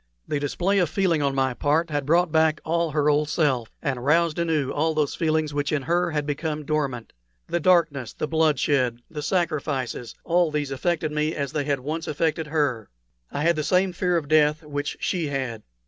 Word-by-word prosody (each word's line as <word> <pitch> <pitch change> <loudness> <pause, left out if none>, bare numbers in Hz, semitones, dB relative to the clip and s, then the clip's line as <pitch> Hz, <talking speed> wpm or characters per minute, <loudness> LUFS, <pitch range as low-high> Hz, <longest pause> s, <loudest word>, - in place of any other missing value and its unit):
The 150 - -1
display 180 +7 0
of 175 -4 +2
feeling 170 -2 +1
on 140 -1 0
my 130 -1 +1
part 155 +6 +1
had 145 -2 -2
brought 170 +1 +3
back 160 -1 +3
all 170 +1 +1
her 150 -1 +1
old 150 0 +2
self, 130 -8 +1
and 130 -3 -2
roused 165 +3 +2
anew 160 -5 0
all 160 +2 0
those 150 -2 +1
feelings 155 -2 0
which 145 0 -1
in 150 -3 0
her 175 +2 +1
had 150 -2 -2
become 150 +1 -3
dormant. 140 -7 -2 0.3
The 175 - -1
darkness, 155 -8 +2
the - - -4
bloodshed, 145 -6 +1
the 150 - -5
sacrifices, 150 -8 -2
all 175 0 +2
these 150 -2 -2
affected 155 +3 -1
me 150 +1 -1
as 140 -2 -3
they 145 -2 -2
had 140 -2 0
once 160 +5 -4
affected 155 +1 -1
her. 145 -8 -1 0.4
I 145 - -2
had 170 +1 +3
the 155 - -1
same 180 +4 +2
fear 180 -1 +1
of 155 -3 -3
death 155 +1 +3
which 145 -1 -4
she 170 -4 -1
had. 130 -6 -3
150 Hz, 195 wpm, -24 LUFS, 145-165 Hz, 0.4 s, brought